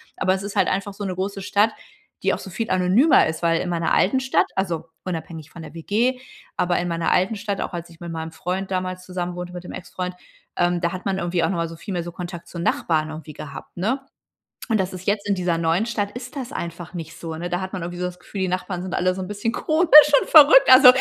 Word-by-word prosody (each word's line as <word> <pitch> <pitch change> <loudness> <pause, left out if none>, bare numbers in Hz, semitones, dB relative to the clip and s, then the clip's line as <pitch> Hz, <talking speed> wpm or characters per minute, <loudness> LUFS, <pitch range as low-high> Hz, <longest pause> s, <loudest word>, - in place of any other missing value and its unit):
Aber 185 - +1
es 190 - -5
ist 200 0 -6
halt - - +3
einfach 195 +1 -2
so 205 - -7
'ne 190 -2 -2
große 195 +2 -3
Stadt, 205 +3 +2 0.5
die - - +2
auch - - -3
so - - -9
viel 225 +4 -4
anonymer 185 - +4
ist. 160 +1 -4
Weil 165 -1 +3
in - - -3
meiner 170 -1 0
alten 260 +8 +3
Stadt 260 0 +2
also, 175 -4 -1 0.2
unabhängig 165 -3 -6
von 170 - -10
der - - -10
WG, 230 +10 0 0.3
aber 175 0 +1
in 175 - -2
meiner 170 -1 0
alten 190 +5 +2
Stadt, 200 -1 -3
auch - - -4
als 170 -1 -6
ich 165 -1 -17
mit 170 -1 -6
meinem 160 0 -5
Freund 185 +4 -4
damals 185 0 -3
zusammenwohnte 180 -1 -5
mit 180 0 -8
dem - - -8
Ex-Freund, 180 0 -5 0.4
ähm, 175 0 +1
da 170 0 -1
hat 185 - -7
man 195 -1 0
irgendwie 175 -1 -1
auch - - +2
noch 195 - -1
mal 165 0 -1
so 165 - -9
viel 195 +5 -8
mehr 175 -2 -2
so 175 0 -8
Kontakt 175 -1 -7
zu - - -9
Nachbarn 160 -2 0
irgendwie 155 -1 -8
gehabt, 140 -1 -10
ne? 220 +10 0 0.7
Und 225 -3 +1
das 190 0 -1
ist 185 0 -8
jetzt 205 0 0
in 200 - +3
dieser 175 -2 0
neuen 165 +5 +1
Stadt, 215 -4 -2
ist 250 +3 -8
das 265 -2 -5
einfach 170 - -6
nicht 165 -1 -7
so, 165 -1 -5
ne? 175 +2 -5
Da 175 +1 -1
hat 190 0 -5
man 185 -3 -4
irgendwie 175 +1 -6
so 180 - -1
das 180 0 -8
Gefühl, 195 +2 -7
die 190 - +1
Nachbarn 180 0 -3
sind 185 0 -4
alle 185 0 +2
so 190 - -5
'n 185 - -5
bisschen 210 +3 -2
komisch 310 -1 +6
und - - -5
verrückt. 315 +11 +8
Also, 255 0 +10
180 Hz, 260 wpm, -23 LUFS, 170-200 Hz, 0.7 s, Also